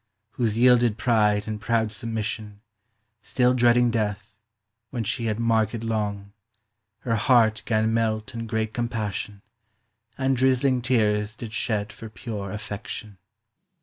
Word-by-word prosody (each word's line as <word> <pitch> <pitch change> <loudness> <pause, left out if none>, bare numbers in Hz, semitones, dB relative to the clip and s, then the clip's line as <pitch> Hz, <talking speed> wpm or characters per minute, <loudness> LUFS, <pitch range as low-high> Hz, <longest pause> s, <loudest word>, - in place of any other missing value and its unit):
Whose 115 -3 -1
yielded 120 -2 +4
pryde 105 -3 +2
and 105 -1 -4
proud 110 -1 +1
submission, 110 -2 -4 0.6
Still 125 +1 +2
dreading 120 -1 +4
death, 105 -1 -2 0.5
when 120 -2 -3
she 115 +3 -2
had 110 0 -1
marked 115 -1 +2
k>ng, 105 -3 -3 0.7
Her 115 -2 0
hart 110 -2 +3
gan 110 -1 +2
melt 110 -1 -1
in 115 -1 -5
great 110 -1 -2
compassion; 110 -4 -3 0.7
And 135 0 +1
drizling 130 0 +2
teares 110 -3 +1
did 115 -1 -8
shed 105 -3 -1
for 110 - -9
pure 105 -3 -6
affection. 105 -1 -7
110 Hz, 125 wpm, -25 LUFS, 105-120 Hz, 0.7 s, yielded